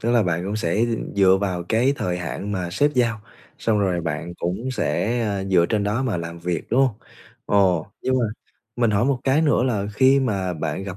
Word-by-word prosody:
tức 115 Hz, -, 0 dB
là 120 Hz, -2 st, +4 dB
bạn 90 Hz, -1 st, -1 dB
cũng 100 Hz, +3 st, -2 dB
sẽ, 85 Hz, -5 st, -1 dB
ừm, 115 Hz, -3 st, -1 dB
dựa 95 Hz, -1 st, +5 dB
vào 95 Hz, -3 st, -2 dB
cái 120 Hz, +5 st, +3 dB
thời 90 Hz, -6 st, -2 dB
hạn 95 Hz, +4 st, -4 dB
mà 90 Hz, -3 st, -3 dB
sếp 145 Hz, +11 st, +2 dB
giao, 115 Hz, -4 st, +1 dB, 0.4 s
xong 110 Hz, -2 st, +1 dB
rồi 90 Hz, -3 st, +1 dB
bạn 85 Hz, +1 st, -4 dB
cũng 95 Hz, +11 st, -3 dB
sẽ, 120 Hz, -1 st, -1 dB
à, 100 Hz, -3 st, -1 dB
dựa 90 Hz, -3 st, +3 dB
trên 105 Hz, -2 st, 0 dB
đó 110 Hz, +6 st, 0 dB
mà 115 Hz, -8 st, -1 dB
làm 85 Hz, 0 st, -6 dB
việc, 85 Hz, -2 st, -3 dB
đúng 125 Hz, +3 st, +3 dB
hông? 130 Hz, -5 st, +2 dB, 0.5 s
Ồ, 95 Hz, -4 st, +2 dB, 0.2 s
nhưng 130 Hz, -, +1 dB
mà 120 Hz, -, +1 dB, 0.5 s
mình 120 Hz, -2 st, +2 dB
hỏi 105 Hz, +3 st, +2 dB
một 135 Hz, -2 st, +1 dB
cái 140 Hz, +4 st, +3 dB
nữa 145 Hz, -4 st, +3 dB
là 105 Hz, -6 st, 0 dB
khi 135 Hz, +4 st, +5 dB
mà 100 Hz, -8 st, -1 dB
bạn 80 Hz, +1 st, -3 dB
gặp 95 Hz, -1 st, -6 dB
100 Hz, 225 wpm, -22 LUFS, 90-120 Hz, 0.5 s, dựa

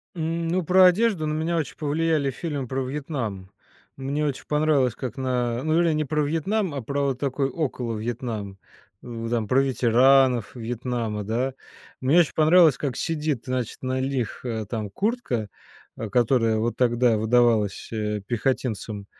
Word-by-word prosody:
Ну, 165 Hz, +2 st, -1 dB
про 185 Hz, +3 st, +6 dB
одежду 180 Hz, -3 st, +3 dB
на 150 Hz, -, -1 dB
меня 160 Hz, +2 st, -1 dB
очень 155 Hz, -5 st, -3 dB
повлияли 155 Hz, -1 st, 0 dB
фильмы 145 Hz, -2 st, -4 dB
про 135 Hz, +2 st, -2 dB
Вьетнам. 130 Hz, -, -4 dB, 0.4 s
Мне 140 Hz, +3 st, -2 dB
очень 140 Hz, -3 st, -3 dB
понравилось, 150 Hz, -4 st, +2 dB
как 130 Hz, -3 st, -6 dB
на 125 Hz, -2 st, -1 dB
ну 155 Hz, +2 st, +2 dB
или 170 Hz, -2 st, +2 dB
не 155 Hz, 0 st, 0 dB
про 150 Hz, +2 st, 0 dB
Вьетнам, 170 Hz, +5 st, -1 dB
а 140 Hz, -, -3 dB
про 140 Hz, +4 st, -2 dB
вот 135 Hz, -2 st, -1 dB
такой 135 Hz, 0 st, -1 dB
около 125 Hz, -7 st, -3 dB
Вьетнам, 110 Hz, -3 st, -4 dB, 0.5 s
м, 115 Hz, -1 st, -6 dB
там 115 Hz, -3 st, -1 dB
про 130 Hz, +5 st, +4 dB
ветеранов 130 Hz, -1 st, +3 dB
Вьетнама, 115 Hz, -2 st, -3 dB
да. 120 Hz, +6 st, -1 dB, 0.5 s
Мне 140 Hz, +7 st, +4 dB
очень 170 Hz, -, +2 dB
понравилось, 160 Hz, -3 st, +5 dB
как 135 Hz, -4 st, -3 dB
сидит, 150 Hz, -6 st, -2 dB
значит, 125 Hz, -3 st, -3 dB
на 130 Hz, 0 st, -1 dB
лих 130 Hz, -4 st, -2 dB
э, 110 Hz, -3 st, -3 dB
там 110 Hz, -2 st, -4 dB
куртка, 190 Hz, -, -2 dB, 0.5 s
а, 110 Hz, -, -5 dB
которая 115 Hz, -1 st, +2 dB
вот 115 Hz, +2 st, -1 dB
тогда 120 Hz, -2 st, +3 dB
выдавалась, 110 Hz, -2 st, +2 dB
э, 105 Hz, -2 st, -2 dB
пехотинцам 110 Hz, -3 st, -2 dB
130 Hz, 155 wpm, -24 LUFS, 115-150 Hz, 0.5 s, про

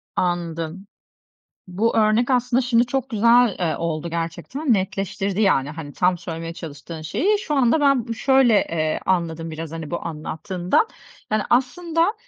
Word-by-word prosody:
Anladım. 175 Hz, +1 st, -2 dB, 0.8 s
Bu 210 Hz, +7 st, 0 dB
örnek 220 Hz, +3 st, +3 dB
aslında 250 Hz, 0 st, +2 dB
şimdi 240 Hz, -1 st, +2 dB
çok 265 Hz, +1 st, -2 dB
güzel, 230 Hz, 0 st, +4 dB
eee, 170 Hz, -3 st, 0 dB
oldu 165 Hz, 0 st, -3 dB
gerçekten. 170 Hz, -, -2 dB
Netleştirdi, 195 Hz, +1 st, -2 dB
yani, 150 Hz, -8 st, +2 dB
hani, 150 Hz, -2 st, -8 dB
tam 180 Hz, +1 st, +1 dB
söylemeye 165 Hz, -1 st, -6 dB
çalıştığın 160 Hz, 0 st, -8 dB
şeyi. 400 Hz, -, +1 dB
Şu 315 Hz, -7 st, -3 dB
anda 270 Hz, +2 st, +3 dB
ben 275 Hz, -5 st, +3 dB
bı 230 Hz, -, -2 dB
şöyle, 265 Hz, -1 st, +4 dB
eee, 155 Hz, -5 st, 0 dB
anladım 165 Hz, -3 st, -1 dB
biraz, 160 Hz, 0 st, -6 dB
hani, 165 Hz, -2 st, -6 dB
bu 170 Hz, -, -4 dB
anlattığından. 175 Hz, -, -1 dB, 0.5 s
Yani, 215 Hz, 0 st, +2 dB
aslında 330 Hz, -, +1 dB
195 Hz, 145 wpm, -22 LUFS, 165-245 Hz, 0.8 s, güzel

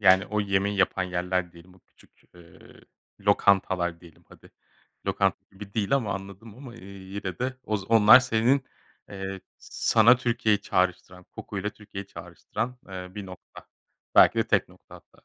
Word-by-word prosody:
yani, 95 Hz, -1 st, +5 dB
o 105 Hz, 0 st, -1 dB
yemeği 100 Hz, 0 st, 0 dB
yapan 95 Hz, -1 st, +1 dB
yerler 90 Hz, 0 st, -2 dB
diyelim, 85 Hz, +2 st, -17 dB
bu 95 Hz, -, -23 dB
küçük, -, -, -27 dB
eee, 85 Hz, -1 st, -17 dB, 0.6 s
lokantalar 95 Hz, -4 st, +2 dB
diyelim 85 Hz, -3 st, -18 dB
hadi. -, -, -18 dB, 0.6 s
Lokanta -, -, +1 dB
gibi 100 Hz, +1 st, -12 dB
değil 105 Hz, 0 st, -1 dB
ama 115 Hz, -8 st, 0 dB
anladım 100 Hz, +3 st, -10 dB
ama, 130 Hz, -2 st, -11 dB
eee, 115 Hz, -, -13 dB
yine 95 Hz, -1 st, -7 dB
de 130 Hz, +1 st, -3 dB
oz 105 Hz, -2 st, -2 dB
onlar 115 Hz, +2 st, +8 dB
senin, 125 Hz, +2 st, +1 dB, 0.4 s
eee, 95 Hz, -1 st, -6 dB, 0.2 s
sana 115 Hz, +2 st, +3 dB
Türkiye'yi 115 Hz, -4 st, 0 dB
çağrıştıran, 90 Hz, -1 st, -2 dB
koku 100 Hz, -, -8 dB
ile 105 Hz, +2 st, -3 dB
Türkiye'yi 100 Hz, -2 st, -10 dB
çağrıştıran, 125 Hz, +4 st, -6 dB
eee, 90 Hz, -1 st, -7 dB
1 105 Hz, -2 st, -7 dB
nokta, 90 Hz, -1 st, -13 dB, 0.5 s
belki -, -, +6 dB
de -, -, +1 dB
tek -, -, +1 dB
nokta -, -, -18 dB
hatta. -, -, -18 dB
100 Hz, 155 wpm, -26 LUFS, 95-110 Hz, 0.6 s, onlar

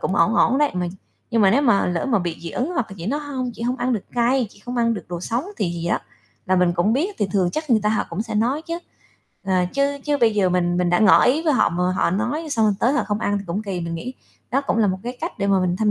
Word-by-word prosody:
cũng 190 Hz, -, -1 dB
ổn 200 Hz, +5 st, +3 dB
ổn 265 Hz, -, +3 dB
đấy. 295 Hz, -1 st, +3 dB
Mà 180 Hz, -1 st, -1 dB, 0.4 s
nhưng 230 Hz, -3 st, +2 dB
mà 195 Hz, -, +6 dB
nếu 275 Hz, +8 st, +3 dB
mà 235 Hz, -8 st, +3 dB
lỡ 175 Hz, -2 st, -1 dB
mà 235 Hz, -6 st, +2 dB
bị 175 Hz, -3 st, -3 dB
dị 170 Hz, -, -5 dB
ứng, 260 Hz, +7 st, -2 dB
hoặc 255 Hz, -8 st, 0 dB
là -, -, -8 dB
chị 170 Hz, -, -6 dB
nói: 285 Hz, +7 st, -1 dB
"Hông, 265 Hz, -4 st, -4 dB
chị 230 Hz, -, -8 dB
hông 250 Hz, +2 st, -1 dB
ăn 250 Hz, 0 st, -1 dB
được 215 Hz, -, -2 dB
cay, 245 Hz, +1 st, +2 dB
chị 205 Hz, -, -19 dB
hông 245 Hz, +1 st, -4 dB
ăn 230 Hz, -1 st, +2 dB
được 205 Hz, -, -7 dB
đồ 175 Hz, -1 st, -5 dB
sống", 235 Hz, -, -2 dB
thì -, -, 0 dB
gì 170 Hz, 0 st, -4 dB
đó -, -, +1 dB, 0.5 s
là 185 Hz, -, +2 dB
mình 180 Hz, -1 st, +3 dB
cũng 175 Hz, +6 st, +1 dB
biết 350 Hz, +10 st, -1 dB
thì 205 Hz, -, +1 dB
thường 185 Hz, -3 st, +2 dB
chắc 310 Hz, -2 st, -4 dB
người 225 Hz, -2 st, +4 dB
ta 210 Hz, -, +2 dB
họ 215 Hz, -, +1 dB
cũng 170 Hz, +5 st, -2 dB
sẽ 225 Hz, -1 st, -6 dB
nói 245 Hz, +8 st, +1 dB
chứ. 335 Hz, +1 st, -4 dB, 0.7 s
Ờ, 190 Hz, -, -1 dB, 0.2 s
chứ 280 Hz, 0 st, +1 dB
chứ 295 Hz, -1 st, +1 dB
bây 225 Hz, -2 st, +4 dB
giờ 200 Hz, -3 st, +3 dB
mình 175 Hz, -1 st, +1 dB
mình 180 Hz, -1 st, +1 dB
đã 175 Hz, -, +3 dB
ngỏ 215 Hz, -, +6 dB
ý 290 Hz, +6 st, +2 dB
với 315 Hz, -, +2 dB
họ 260 Hz, -, +3 dB
mà 180 Hz, +1 st, 0 dB
họ 175 Hz, -, +1 dB
nói, 240 Hz, -, -2 dB
xong 225 Hz, -6 st, +2 dB
rồi 210 Hz, -, +2 dB
tới 250 Hz, +4 st, +3 dB
họ 295 Hz, -, +1 dB
không 205 Hz, 0 st, -1 dB
ăn 205 Hz, -2 st, 0 dB
thì 200 Hz, -, -8 dB
cũng 180 Hz, +5 st, -3 dB
kỳ, 195 Hz, -4 st, -4 dB
mình 170 Hz, 0 st, -4 dB
nghĩ 245 Hz, +10 st, -5 dB, 0.4 s
đó 275 Hz, -, +2 dB
cũng 275 Hz, -, -1 dB
là 220 Hz, -, +4 dB
một 190 Hz, -1 st, -1 dB
cái 245 Hz, +1 st, -5 dB
cách 330 Hz, -5 st, -5 dB
để 200 Hz, -, 0 dB
mà 195 Hz, -1 st, +3 dB
mình 180 Hz, -1 st, 0 dB
thăm 215 Hz, +1 st, +2 dB
220 Hz, 315 wpm, -22 LUFS, 185-255 Hz, 0.7 s, mà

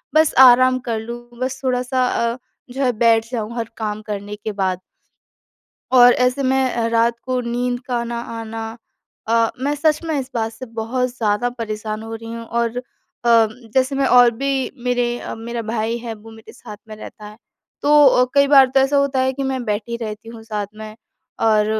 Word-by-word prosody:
बस 315 Hz, -1 st, +4 dB, 0.2 s
आराम 255 Hz, +1 st, +4 dB
कर 225 Hz, -, -1 dB
लूँ 235 Hz, +2 st, -8 dB
बस 260 Hz, +1 st, -3 dB
थोड़ा-सा 255 Hz, 0 st, 0 dB, 0.3 s
अ, -, -, -9 dB, 0.3 s
जो 265 Hz, +3 st, -3 dB
है 255 Hz, -, +3 dB
बैठ 225 Hz, 0 st, +3 dB
जाऊँ 230 Hz, -1 st, -4 dB
हर 230 Hz, -1 st, -3 dB
काम 215 Hz, -1 st, -3 dB
करने 205 Hz, -1 st, -6 dB
के 215 Hz, +1 st, -5 dB
बाद। 190 Hz, -3 st, -1 dB, 1.1 s
और 245 Hz, -1 st, +8 dB
ऐसे 250 Hz, +3 st, +1 dB
मैं 265 Hz, 0 st, +2 dB
अ, 230 Hz, -1 st, 0 dB
रात 230 Hz, 0 st, +1 dB
को 255 Hz, -1 st, -1 dB
नींद 245 Hz, +1 st, -2 dB
का 245 Hz, -2 st, -1 dB
ना 235 Hz, 0 st, -4 dB
आना 225 Hz, -1 st, -6 dB, 0.5 s
अ, 230 Hz, 0 st, +3 dB
मैं 285 Hz, +2 st, 0 dB
सच 305 Hz, +1 st, +1 dB
में 320 Hz, -3 st, -1 dB
इस 260 Hz, -1 st, -5 dB
बात 225 Hz, -1 st, -1 dB
से 230 Hz, +3 st, -9 dB
बहुत 230 Hz, +2 st, -2 dB
ज़्यादा 220 Hz, +1 st, 0 dB
परेशान 215 Hz, -2 st, -5 dB
हो 225 Hz, 0 st, -7 dB
रही 225 Hz, 0 st, -8 dB
हूँ। 230 Hz, 0 st, -6 dB
और 235 Hz, +1 st, -1 dB
अ, -, -, -5 dB, 0.4 s
जैसे 235 Hz, +3 st, +2 dB
मैं 275 Hz, -1 st, +1 dB
और 245 Hz, -1 st, +6 dB
भी 270 Hz, +2 st, -2 dB
मेरे 245 Hz, -1 st, 0 dB
अ, -, -, -6 dB
मेरा 230 Hz, +1 st, -5 dB
भाई 230 Hz, 0 st, -1 dB
है 230 Hz, -1 st, -6 dB
वो 220 Hz, +1 st, -14 dB
मेरे 220 Hz, 0 st, -14 dB
साथ 210 Hz, -, -11 dB
में 215 Hz, -, -9 dB
रहता 215 Hz, 0 st, -11 dB
है 210 Hz, 0 st, -12 dB, 0.5 s
तो 295 Hz, 0 st, +6 dB
अ, 250 Hz, -1 st, +5 dB
कई 280 Hz, 0 st, +5 dB
बार 275 Hz, -2 st, +7 dB
तो 270 Hz, -, +6 dB
ऐसा 270 Hz, +2 st, +2 dB
होता 280 Hz, -2 st, +1 dB
है 260 Hz, 0 st, +1 dB
कि 275 Hz, -, -5 dB
मैं 265 Hz, -1 st, -2 dB
बैठी 220 Hz, +2 st, -3 dB
रहती 220 Hz, -1 st, -7 dB
हूँ 230 Hz, -1 st, -10 dB
साथ 210 Hz, -2 st, -4 dB
में 215 Hz, 0 st, -9 dB, 0.5 s
और 215 Hz, -1 st, +3 dB
235 Hz, 200 wpm, -20 LUFS, 225-255 Hz, 1.1 s, और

